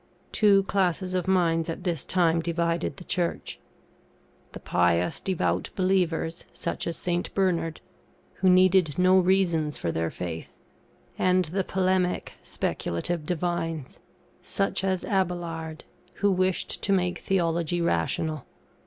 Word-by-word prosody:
Two 200 Hz, -2 st, +4 dB
classes 185 Hz, -1 st, 0 dB
of 185 Hz, 0 st, -1 dB
minds 165 Hz, -3 st, +2 dB
at 165 Hz, +2 st, -5 dB
this 170 Hz, -6 st, -2 dB
time 170 Hz, -3 st, +3 dB
divided 170 Hz, 0 st, -1 dB
the 180 Hz, -, -9 dB
Church 175 Hz, -1 st, -2 dB, 0.9 s
the -, -, -8 dB
pious, 90 Hz, 0 st, +1 dB
devout 190 Hz, -3 st, -1 dB
believers 180 Hz, -3 st, 0 dB
(such -, -, -4 dB
as 170 Hz, -, -2 dB
St. 175 Hz, 0 st, -2 dB
Bernard), 170 Hz, -4 st, 0 dB, 0.6 s
who 190 Hz, -, +3 dB
needed 185 Hz, -4 st, +4 dB
no 185 Hz, +1 st, +5 dB
reasons 175 Hz, -5 st, +2 dB
for 85 Hz, -, -2 dB
their 80 Hz, 0 st, -1 dB
faith, 85 Hz, -2 st, -5 dB, 0.7 s
and 185 Hz, 0 st, +3 dB
the 185 Hz, +5 st, -1 dB
polemic 185 Hz, -1 st, 0 dB
speculative 150 Hz, -, -3 dB
divines 165 Hz, -4 st, -2 dB, 0.4 s
(such 195 Hz, -1 st, -1 dB
as 190 Hz, -2 st, 0 dB
Abaelard), 170 Hz, -5 st, -2 dB, 0.3 s
who 200 Hz, -1 st, +2 dB
wished 185 Hz, 0 st, 0 dB
to 200 Hz, -, -1 dB
make 180 Hz, -2 st, +1 dB
Theology 170 Hz, -2 st, 0 dB
rational. 155 Hz, -, -1 dB
175 Hz, 125 wpm, -26 LUFS, 165-185 Hz, 0.9 s, no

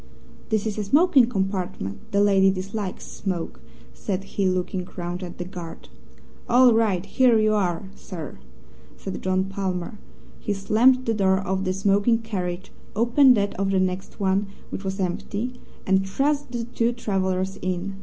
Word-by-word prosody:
"This 220 Hz, -2 st, 0 dB
is 215 Hz, -1 st, -2 dB
a -, -, 0 dB
smoking 280 Hz, -, +5 dB
compartment. 190 Hz, -, -3 dB
The 200 Hz, -, +3 dB
lady 195 Hz, -1 st, +5 dB
dislikes 195 Hz, +1 st, -4 dB
smoke," 185 Hz, -4 st, -4 dB, 0.3 s
said 195 Hz, -2 st, -3 dB
he, 195 Hz, 0 st, -1 dB
looking 185 Hz, 0 st, -2 dB
round 175 Hz, +1 st, -4 dB
at 175 Hz, -2 st, -7 dB
the 175 Hz, -, -4 dB
guard. 175 Hz, -2 st, -9 dB, 0.6 s
"All 245 Hz, 0 st, +6 dB
right! 205 Hz, -5 st, +1 dB
Here 250 Hz, -3 st, +4 dB
you 215 Hz, 0 st, +3 dB
are, 185 Hz, -4 st, 0 dB
sir!" 165 Hz, -, -8 dB, 0.6 s
said 190 Hz, -, -6 dB
John 185 Hz, 0 st, +1 dB
Palmer. 190 Hz, +1 st, -4 dB, 0.4 s
He 205 Hz, -, -2 dB
slammed 240 Hz, +6 st, +3 dB
the 230 Hz, -, +1 dB
door 190 Hz, -3 st, +3 dB
of 190 Hz, 0 st, -2 dB
the 185 Hz, -, +1 dB
smoking 200 Hz, +4 st, +2 dB
carriage, 190 Hz, -4 st, -4 dB, 0.2 s
opened 240 Hz, +3 st, +5 dB
that 200 Hz, 0 st, 0 dB
of 195 Hz, 0 st, +1 dB
the 195 Hz, -1 st, +2 dB
next 185 Hz, +2 st, -2 dB
one, 195 Hz, +1 st, +1 dB, 0.2 s
which 195 Hz, -, -5 dB
was 190 Hz, +1 st, -3 dB
empty, 205 Hz, +6 st, -3 dB, 0.2 s
and 190 Hz, 0 st, +2 dB
thrust 285 Hz, +4 st, 0 dB
the 240 Hz, -2 st, -3 dB
two 235 Hz, 0 st, 0 dB
travellers 190 Hz, -4 st, -1 dB
in. 185 Hz, +2 st, -3 dB
195 Hz, 160 wpm, -24 LUFS, 185-220 Hz, 0.6 s, All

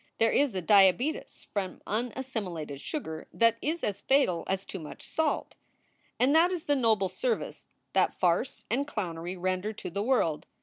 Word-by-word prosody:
There 225 Hz, 0 st, +3 dB
is 275 Hz, -7 st, +2 dB
a 185 Hz, -, -2 dB
diabetes 205 Hz, -, +3 dB
from 195 Hz, -3 st, -2 dB
unassimilated 215 Hz, -, -3 dB
sugar 160 Hz, -, -5 dB
that 230 Hz, -1 st, +3 dB
is 325 Hz, +3 st, -2 dB
as 205 Hz, -, -2 dB
fatal 265 Hz, -11 st, +2 dB
as 195 Hz, 0 st, -1 dB
too 190 Hz, -, -6 dB
much 150 Hz, -3 st, -9 dB
salt. 320 Hz, -1 st, -1 dB, 0.7 s
And 265 Hz, +3 st, +4 dB
that 340 Hz, +3 st, +5 dB
is 350 Hz, -4 st, -3 dB
the 290 Hz, -, +2 dB
noble 220 Hz, -7 st, +3 dB
service 475 Hz, -, -2 dB, 0.3 s
that -, -, +3 dB
farce -, -, 0 dB
and 280 Hz, +2 st, +1 dB
clownery 180 Hz, -, -4 dB
render 185 Hz, +4 st, -1 dB
to 205 Hz, -, -7 dB
the 200 Hz, -, -2 dB
world. 210 Hz, -, +1 dB
215 Hz, 165 wpm, -29 LUFS, 185-270 Hz, 0.7 s, that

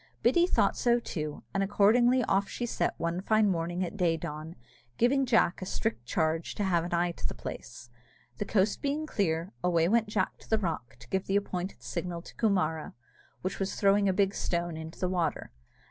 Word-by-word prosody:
Biddy 345 Hz, 0 st, +4 dB
thought -, -, +2 dB
so 240 Hz, -1 st, +3 dB
too, 155 Hz, -9 st, -5 dB
and 195 Hz, -, +1 dB
accordingly 240 Hz, +6 st, +4 dB
off 195 Hz, -2 st, +1 dB
she 240 Hz, -, -3 dB
set 240 Hz, -, -1 dB
one 170 Hz, +2 st, -1 dB
fine 215 Hz, +1 st, +3 dB
morning 175 Hz, 0 st, -1 dB
at 180 Hz, -, -7 dB
day 170 Hz, -4 st, +2 dB
dawn, 155 Hz, 0 st, -6 dB, 0.4 s
giving 265 Hz, +2 st, +3 dB
Jack 220 Hz, -7 st, +3 dB
a -, -, -3 dB
strict 115 Hz, -6 st, -2 dB
charge 160 Hz, +4 st, 0 dB
to 205 Hz, -, -1 dB
have 175 Hz, -4 st, +2 dB
an 175 Hz, -, -5 dB
eye 175 Hz, 0 st, +1 dB
to -, -, -4 dB
the -, -, -7 dB
place. 120 Hz, 0 st, -8 dB, 0.5 s
The -, -, -1 dB
coast 200 Hz, 0 st, +1 dB
being 290 Hz, +2 st, -1 dB
clear, 180 Hz, -, -1 dB
away 170 Hz, -2 st, +3 dB
went 225 Hz, +2 st, +3 dB
Jack 210 Hz, -, -1 dB
to -, -, -17 dB
the 220 Hz, -, +3 dB
rock 160 Hz, -, -3 dB
to 120 Hz, -, -14 dB
give 190 Hz, 0 st, -1 dB
the 195 Hz, -, +1 dB
appointed 185 Hz, -, -2 dB
signal 170 Hz, +8 st, -4 dB
to -, -, -12 dB
Coomara, 180 Hz, -8 st, 0 dB, 0.5 s
which 185 Hz, -, -3 dB
was 195 Hz, 0 st, -2 dB
throwing 200 Hz, 0 st, +3 dB
a -, -, +2 dB
big 195 Hz, 0 st, +2 dB
stone 170 Hz, -3 st, -2 dB
into 160 Hz, +1 st, -8 dB
the 185 Hz, -, 0 dB
water. 175 Hz, -, -1 dB
185 Hz, 200 wpm, -29 LUFS, 165-210 Hz, 0.5 s, Biddy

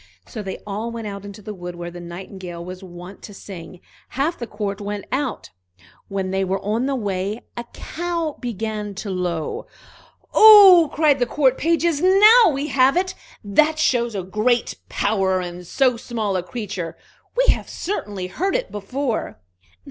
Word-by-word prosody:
So 220 Hz, -, -7 dB
they 195 Hz, -2 st, -5 dB
all 210 Hz, +3 st, -4 dB
went 230 Hz, -1 st, -6 dB
out 200 Hz, -1 st, -6 dB
into 200 Hz, +1 st, -10 dB
the 215 Hz, 0 st, -6 dB
wood 180 Hz, -2 st, -7 dB
where 175 Hz, 0 st, -6 dB
the 175 Hz, -, -9 dB
Nightingale 175 Hz, 0 st, -8 dB
was 185 Hz, +1 st, -8 dB
wont 180 Hz, +1 st, -11 dB
to 205 Hz, -, -10 dB
sing; 185 Hz, -2 st, -10 dB, 0.3 s
half 290 Hz, +6 st, -1 dB
the 235 Hz, -, -6 dB
court 205 Hz, -1 st, -4 dB
went 205 Hz, -1 st, -4 dB
out. 265 Hz, -2 st, -3 dB, 0.6 s
When 195 Hz, -1 st, -3 dB
they 190 Hz, 0 st, 0 dB
were 190 Hz, +1 st, -1 dB
on 220 Hz, +6 st, -1 dB
the 275 Hz, -, 0 dB
way, 205 Hz, -1 st, -2 dB
a 240 Hz, -, -5 dB
cow 335 Hz, +3 st, -4 dB
began 215 Hz, -3 st, -4 dB
to 205 Hz, 0 st, -5 dB
low. 175 Hz, -4 st, -3 dB, 0.7 s
"Oh!" 395 Hz, -7 st, +9 dB
cried 295 Hz, -3 st, +3 dB
the 245 Hz, -, +1 dB
court 265 Hz, -1 st, +2 dB
pages, 330 Hz, -1 st, +1 dB
"now 415 Hz, +4 st, +7 dB
we 275 Hz, 0 st, -2 dB
have 265 Hz, +3 st, +4 dB
it! 370 Hz, 0 st, 0 dB, 0.3 s
That 300 Hz, +10 st, +3 dB
shows 240 Hz, -7 st, +1 dB
a 190 Hz, -, -2 dB
great 215 Hz, +6 st, 0 dB
power 195 Hz, -3 st, +1 dB
in 180 Hz, 0 st, -6 dB
so 250 Hz, +6 st, +2 dB
small 220 Hz, -4 st, -3 dB
a 185 Hz, -, +1 dB
creature! 185 Hz, -2 st, -6 dB, 0.4 s
We -, -, +5 dB
have -, -, -7 dB
certainly 205 Hz, -, -4 dB
heard 360 Hz, -, -2 dB
it -, -, -2 dB
before." 235 Hz, +5 st, -3 dB
215 Hz, 170 wpm, -22 LUFS, 190-275 Hz, 0.7 s, Oh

